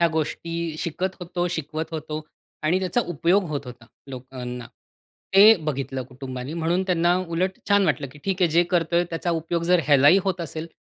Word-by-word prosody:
ह्या 170 - +5
गोष्टी 165 +1 -3
शिकत 185 +4 -3
होतो, 175 0 -2
शिकवत 160 -1 -4
होतो 155 -1 -4 0.4
आणि 165 +4 +2
त्याचा 185 +5 0
उपयोग 175 +4 +2
होत 145 -2 -2
होता, 120 -1 -11 0.2
लोकांना. 125 -1 -7 0.7
ते 210 +3 +9
बघितलं 135 -3 -3
कुटुंबानी 130 +2 -7
म्हणून 170 +2 0
त्यांना 175 -1 +3
उलट 185 +3 -1
छान 200 0 +4
वाटलं, 150 -2 0
की 150 - -14
"ठीक 190 -1 -1
आहे, 175 - +5
जे 170 +3 +4
करतोय 170 -1 +2
त्याचा 170 +1 -2
उपयोग 165 +1 -1
जर 180 0 +4
ह्यालाही 145 +5 +6
होत 190 -2 -1
असेल 160 0 -5
165 Hz, 170 wpm, -24 LUFS, 145-175 Hz, 0.7 s, ते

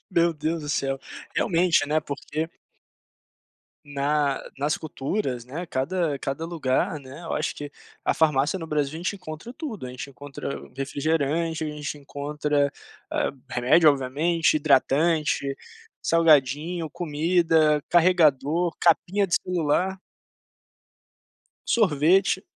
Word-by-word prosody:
meu 170 -1 +3
Deus 155 +1 -2
do 150 - -6
céu, 135 -2 -1 0.4
realmente, 175 -6 +2
né, 155 +1 +2
porque 155 +2 -4 1.4
na 145 0 0 0.2
nas 145 +3 0
culturas, 135 - -3
né, 160 +8 -6
cada 155 +2 -1
cada 135 +4 -3
lugar, 150 -2 -1
né, 135 +4 -11
eu - - -4
acho 150 - -1
que 145 - -6 0.4
a - - +2
farmácia 150 +1 +2
no 165 - -5
Brasil, 150 -1 -1
a - - -4
gente 185 +4 -2
encontra 180 +5 -8
tudo, 250 - -6
a 125 - -7
gente 125 +2 -7
encontra 140 0 -7 0.2
refrigerante, 155 +3 -1
a - - -2
gente 150 0 -5
encontra, 145 0 -1 0.4
hã, - - 0 0.2
remédio 135 +6 +5
obviamente, 150 +6 +1
hidratante, 145 0 +2 0.4
salgadinho, 160 +1 +3
comida, 160 -1 +2
carregador, 170 -1 +3
capinha 185 +4 +3
de 170 - 0
celular. 180 +2 0 1.7
Sorvete. 190 -1 +3
155 Hz, 115 wpm, -25 LUFS, 140-170 Hz, 1.7 s, remédio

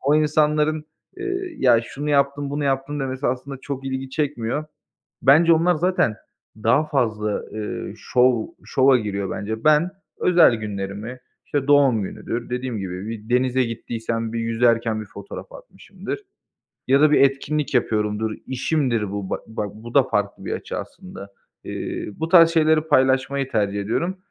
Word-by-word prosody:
o 140 +2 +2
insanların, 150 0 +2 0.3
eee, 375 -2 -4
"Ya, 120 -3 +5
şunu 145 +5 -5
yaptım, 140 0 +1
bunu 145 0 -2
yaptım." 135 +2 -1
demesi 130 0 -2
aslında 130 +2 -3
çok 135 -2 -5
ilgi 130 0 -4
çekmiyor. 145 -1 -2 0.6
Bence 160 +6 +6
onlar 170 +2 +3
zaten 175 - +1 0.4
daha 115 +8 +2
fazla, 110 -7 -1
eee, 105 -1 -5
şov 125 -2 +2 0.2
şova 130 0 +4
giriyor 100 -3 -3
bence. 110 +4 -4
Ben 155 +4 +4 0.3
özel 175 -8 +5
günlerimi, 105 +2 -5 0.3
işte, 145 -2 -1
doğum 140 -7 +4
günüdür, 115 +5 -5
dediğim 125 -2 -3
gibi, 95 +1 -5
bir 110 -1 -7
denize 130 +1 +2
gittiysem 115 0 -4
bir 115 - -2
yüzerken 115 -1 +1
bir 105 - -8
fotoğraf 100 0 -10
atmışımdır - - -8 0.7
ya 135 +2 +4
da 155 -1 +5
bir 150 - +5
etkinlik 140 +2 +1
yapıyorumdur, 110 -2 0 0.2
işimdir 130 -5 0
bu, 100 -2 -4
ba - - -1
bak, 105 -2 -4
bu 115 +3 -11
da 140 - +6
farklı 105 -5 -2
bir - - -3
açı - - -5
aslında. 100 0 -9 0.3
Eee, - - -5
bu 160 - -3
tarz 165 -2 +8
şeyleri 160 -1 +3
paylaşmayı 135 -1 +2
tercih 100 -2 0
ediyorum. 170 - -2
130 Hz, 150 wpm, -22 LUFS, 110-150 Hz, 0.7 s, tarz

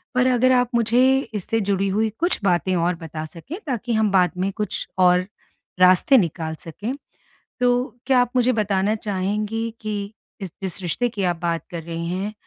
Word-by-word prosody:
पर 250 0 +3
अगर 255 +1 +3
आप 250 -1 +3
मुझे 245 +4 +4 0.2
इससे 215 +3 -1
जुड़ी 195 0 +1
हुई 215 +3 +1
कुछ 345 +2 +1
बातें 185 0 +2
और 175 +1 +1
बता 160 -2 -7
सकें, 170 - -9
ताकि 240 -2 -2
हम 220 -2 +2
बाद 180 -3 +4
में 190 +2 0
कुछ 210 -1 -3
और 180 0 +4 0.5
रास्ते 185 +9 +6
निकाल 160 -4 -1
सकें, 210 - -5 0.7
तो 245 -1 +1
क्या 260 -2 +4
आप 245 -1 +1
मुझे 250 +1 +3
बताना 205 -1 +1
चाहेंगी 210 +2 -2
कि 210 -1 -4 0.3
इस 185 -4 -6
जिस 190 0 -2
रिश्ते 240 +8 0
की 205 -5 -3
आप 175 -1 +1
बात 170 -1 -1
कर 170 -2 -5
रही 170 0 -5
हैं 195 +4 -3
205 Hz, 180 wpm, -22 LUFS, 180-235 Hz, 0.7 s, रास्ते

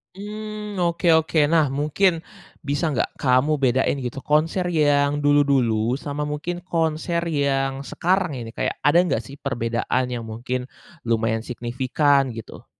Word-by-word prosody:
Mmm, 210 0 -6
oke 170 0 0
oke. 160 -1 +1
Nah 160 -3 +4
mungkin 155 +5 +1 0.4
bisa 145 +4 -1
nggak - - -2
kamu 135 +3 +2
bedain 130 +1 +1
gitu 125 +1 -5
konser 155 +5 +1
yang 145 -2 +2
dulu-dulu 135 -5 +2
sama 145 0 -4
mungkin 165 +4 -4
konser 165 -1 -1
yang 135 -2 0
sekarang 180 +3 0
ini, 115 -1 -7
kayak - - -2
ada 145 +4 +3
nggak 180 - 0
sih 140 - -11
perbedaan 125 -1 -1
yang 120 -2 -4
mungkin 125 +3 -5 0.3
lumayan 115 -1 0
signifikan 130 +3 +1
gitu? 115 -1 -10
145 Hz, 135 wpm, -23 LUFS, 125-165 Hz, 0.4 s, Nah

